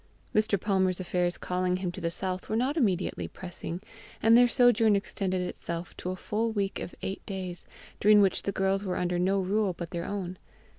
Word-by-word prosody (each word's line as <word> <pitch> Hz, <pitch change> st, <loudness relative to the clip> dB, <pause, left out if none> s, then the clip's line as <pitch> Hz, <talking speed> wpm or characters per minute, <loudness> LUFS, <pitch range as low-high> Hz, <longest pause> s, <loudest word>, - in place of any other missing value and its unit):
Mr. 215 Hz, -2 st, +2 dB
Palmer's 190 Hz, -2 st, +1 dB
affairs 180 Hz, -1 st, 0 dB
calling 180 Hz, 0 st, 0 dB
him 185 Hz, -1 st, -2 dB
to -, -, -8 dB
the 170 Hz, -, 0 dB
south 185 Hz, +2 st, -2 dB
were 215 Hz, -, 0 dB
not 255 Hz, +6 st, +1 dB
immediately 185 Hz, -, 0 dB
pressing, 175 Hz, -, -6 dB, 0.4 s
and 225 Hz, +1 st, +6 dB
their 245 Hz, +1 st, +7 dB
sojourn 235 Hz, -4 st, +4 dB
extended 190 Hz, -2 st, -1 dB
itself 170 Hz, -1 st, -5 dB
to 180 Hz, -, -5 dB
a 185 Hz, -, -2 dB
full 220 Hz, +4 st, -1 dB
week 200 Hz, -3 st, -1 dB
of -, -, -6 dB
eight 195 Hz, -, -4 dB
days, 185 Hz, -3 st, -5 dB, 0.3 s
during 210 Hz, 0 st, +6 dB
which 195 Hz, -2 st, +3 dB
the 200 Hz, -, -2 dB
girls 195 Hz, +1 st, 0 dB
were 185 Hz, -3 st, -2 dB
under 180 Hz, 0 st, 0 dB
no 190 Hz, +2 st, +2 dB
rule 195 Hz, +1 st, +1 dB
but 170 Hz, 0 st, -7 dB
their 170 Hz, -1 st, -3 dB
own. 185 Hz, -3 st, -4 dB
190 Hz, 195 wpm, -29 LUFS, 180-205 Hz, 0.4 s, their